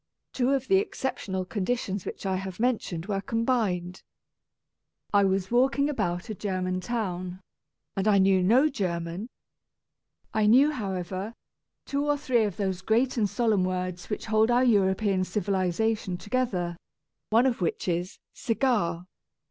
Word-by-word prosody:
Two 250 -1 +1
of 270 -1 +1
the 385 - +5
exceptional 225 - -2
conditions 200 0 -2
which - - -6
I 190 -1 0
have 190 0 -6
mentioned 220 -9 -1
were 195 -1 -2
combined. 210 -7 -1 1.1
I 200 0 +5
was 190 0 0
walking 270 +4 +3
about 180 -8 -2
a 220 - -4
German 185 -2 -2
town, 185 -5 -3 0.6
and 195 +2 0
I 205 -2 +5
knew 190 -1 +4
no 240 +11 +5
German. 180 - -3 1.0
I 215 -1 +2
knew, 265 +7 +6
however, 195 - -4 0.5
two 280 0 -1
or 290 0 +1
three 250 -6 +2
of 200 -4 -4
those 190 -3 -2
great 230 +6 +1
and 215 -4 +1
solemn 220 -5 +2
words 185 -1 -3
which 210 - -3
hold 220 0 +3
our 245 +1 +4
European 195 -4 +2
civilization 190 +1 -1
to 205 - -13
gether 185 -10 0 0.3
— - - -59
one 230 +4 +4
of 245 -6 0
which 170 - -1
is 175 +3 -2 0.2
"cigar." 215 -9 0
205 Hz, 150 wpm, -27 LUFS, 185-240 Hz, 1.1 s, knew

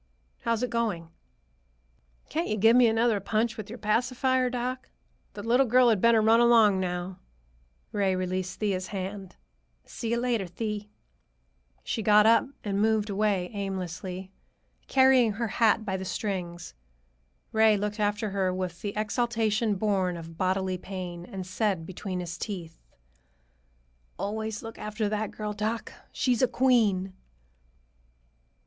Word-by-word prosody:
"How's 230 0 -1
it 250 - -2
going?" 210 -8 -1 1.2
"Can't 330 +3 -2
you 215 - -1
give 225 +3 +5
me 250 -1 +6
another 225 -1 +2
punch 220 +3 0
with 215 -2 -7
your 235 - -7
pacifier, 250 +4 +1
doc? 250 +1 -4 0.5
The 205 - -6
little 245 +4 +3
girl 250 +1 +5
had 215 -5 +2
better 230 -2 +5
run 225 +1 +5
along 225 -5 +5
now." 180 0 -3 0.7
Ray 195 -3 +1
released 185 0 -3
Thea's 190 -3 -1
hand. 195 -1 -6 0.5
"See 230 - -5
you 235 - +1
later, 235 -5 0
Thee." 210 +2 -4 0.9
She 225 - -2
got 210 0 +5
up 230 +3 +5 0.2
and 200 -1 -1
moved 215 -1 +1
away 195 -3 0
aimlessly, 190 -1 -5 0.6
carrying 260 -4 +5
her 230 +3 -2
hat 220 0 +2
by 190 -2 -1
the 190 - -5
strings. 180 - -4 0.8
Ray 220 -1 +4
looked 210 +1 -3
after 210 0 0
her 190 -1 0
with 180 -2 -4
the 205 -1 -3
exaltation 220 -1 0
born 190 -3 0
of 165 0 -9
bodily 185 +1 0
pain 180 -2 -6
and 190 0 -7
said 185 -2 -1
between 185 0 -5
his 175 -1 -6
teeth, 175 -6 -5 1.4
"Always 220 +1 -3
look 225 0 -8
after 215 0 -2
that 210 0 -2
girl, 210 -1 -5
doc. 220 +2 -3 0.2
She's 250 -3 +1
a 255 - +5
queen!" 220 -7 +2
210 Hz, 140 wpm, -27 LUFS, 190-230 Hz, 1.4 s, me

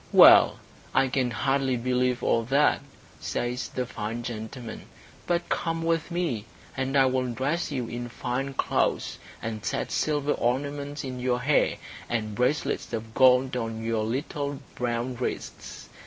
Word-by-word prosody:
"Well, - - +9 0.4
I 135 0 +4
can 130 -1 +1
hardly 135 +3 +1
believe 125 0 0
all 115 - +3
that," 140 +4 +3 0.4
says 120 +1 -2
the 125 - -3
fine 115 0 -4
gentleman, 115 0 -6 0.4
"But 175 0 0
come 165 -1 -1
with 165 0 0
me, 170 - -1 0.3
and 135 +1 0
I 135 - +6
will 130 0 +1
dress 140 +10 -1
you 130 -4 -2
in 120 +1 -5
fine 135 +3 -3
clothes, - - 0 0.2
and 110 -2 -4
set - - -2
silver 145 -1 +1
ornaments 140 +4 -1
in 130 -2 -5
your 125 0 0
hair, 140 +3 +3 0.3
and 110 -2 -1
bracelets 125 +7 0
of 110 0 -4
gold 130 0 +5
on 115 -2 -3
your 115 -1 0
little 140 +4 -2 0.2
brown 120 +1 -2
wrists. 125 - -5
125 Hz, 145 wpm, -27 LUFS, 120-140 Hz, 0.4 s, Well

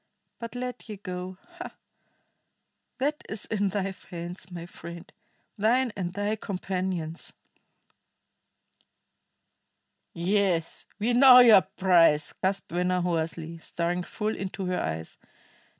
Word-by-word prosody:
But 230 0 -7
let 250 -2 -5
ye 210 - -6
go 185 -1 -6 0.2
ha! 360 - -7 1.2
That 290 +4 -1
is 215 -1 -3
in 205 -2 0
thy 195 0 -2 0.2
hands, 175 +1 -6
my 175 -2 -7
friend, 170 0 -10 0.5
thine 240 +4 +3
and 180 -3 -3
thy 205 +2 -1
companions." 185 -4 -3 2.8
"Yes, 180 -2 0
we 225 +4 0
know 255 +1 +9
your 235 -6 +9
price!" 170 -7 +3
gasped 195 -1 -1
Venner 180 +1 +1
hoarsely, 165 -1 -2
staring 175 +2 -2
full 215 +4 -3
into 195 0 -4
her 180 0 -1
eyes. 80 +1 -4
185 Hz, 110 wpm, -27 LUFS, 175-210 Hz, 2.8 s, know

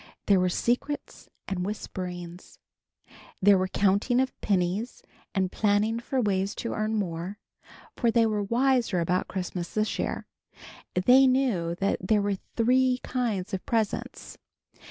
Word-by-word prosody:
There 200 -2 +4
were 180 0 +2
secrets 250 +9 -2 0.2
and 185 -2 -2
whisperings. 180 -3 -6 0.8
There 200 +1 +6
was 185 0 -1
counting 205 +5 +2
of 260 0 0
pennies 195 +4 -1 0.3
and 190 -1 +1
planning 215 +2 +1
of 260 -4 +2
ways 195 0 0
to 230 - -4
earn 215 0 -1
more, 185 -1 -3 0.6
for 235 - +1
they 230 0 +4
were 215 -2 0
wiser 235 -2 +2
about 180 +2 0
Christmas 180 -2 -4
this 215 0 0
year. - - -2 0.7
They 250 +9 +6
knew 235 -11 +1
that 195 +3 0
there 205 +2 +2
are 200 -1 +1 0.2
three 255 +2 +3
kinds 225 -8 -2
of 190 - -2
presents. 220 -3 -2
205 Hz, 135 wpm, -27 LUFS, 185-235 Hz, 0.8 s, There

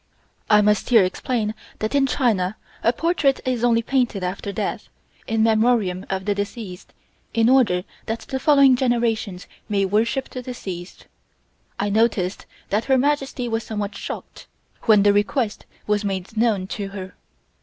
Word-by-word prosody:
I 210 -1 +6
must 210 0 +2
here 230 -5 +7
explain 215 +3 -1 0.2
that 215 +3 -3
in 275 -1 +3
China 215 -8 +1 0.2
a 230 - +3
portrait 295 -1 +1
is 250 -2 -1
only 230 -1 +3
painted 245 -7 0
after 185 +2 -3
death, - - -4 0.4
in 225 -1 +1
memorium 220 -4 +2
of 190 -1 -2
the 205 - +1
deceased, 200 -2 -6 0.4
in 225 0 +4
order 235 -9 +4 0.2
that 225 +1 -2
the 265 - -4
following 280 -3 +6
generations 230 -7 0 0.2
may 200 -2 +2
worship 225 +7 0
the 255 - -7
deceased. 190 -8 -7 0.7
I 205 0 0
noticed 205 -4 +1 0.2
that 210 +3 +1
Her 265 -1 +3
Majesty 270 -2 0
was 225 -1 -1
somewhat 205 -2 -4
shocked - - -8 0.4
when 215 -3 +6
the 205 0 +5
request 205 +2 0 0.2
was 210 0 +1
made 195 +1 -4
known 215 -4 +1 0.2
to 200 - -3
her. 190 -2 -8
220 Hz, 155 wpm, -22 LUFS, 200-245 Hz, 0.7 s, here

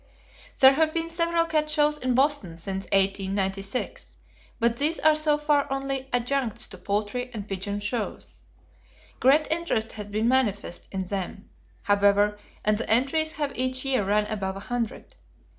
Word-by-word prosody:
There 265 0 +8
have 315 +2 +1
been 330 0 -2
several 335 0 +1
cat 310 -2 0
shows 300 -1 +2
in 255 -2 0
Boston 265 - +1
since 190 +3 -4
1896, 195 +2 -1 0.4
but 235 0 +2
these 305 +5 +1
are 310 0 +5
so 305 -1 +3
far 295 -2 +1
only 270 -1 -2
adjuncts 245 -1 -1
to 185 - -11
poultry 210 +6 -2
and 205 -1 -6
pigeon 200 +1 -3
shows. 210 +2 -4 0.8
Great 285 +4 +5
interest 320 -10 0
has 210 -1 -7
been 215 +2 0
manifest 220 -8 0
in 190 -1 -2
them, 195 +1 -5 0.3
however, 205 +1 +3 0.3
and 210 0 +2
the 235 - -4
entries 280 +8 +2
have 295 -3 -2
each 255 +1 -1
year 260 -5 +2
run 210 +2 +2
above 195 -3 -3
a - - -6
hundred. 245 - -4
240 Hz, 155 wpm, -26 LUFS, 205-290 Hz, 0.8 s, There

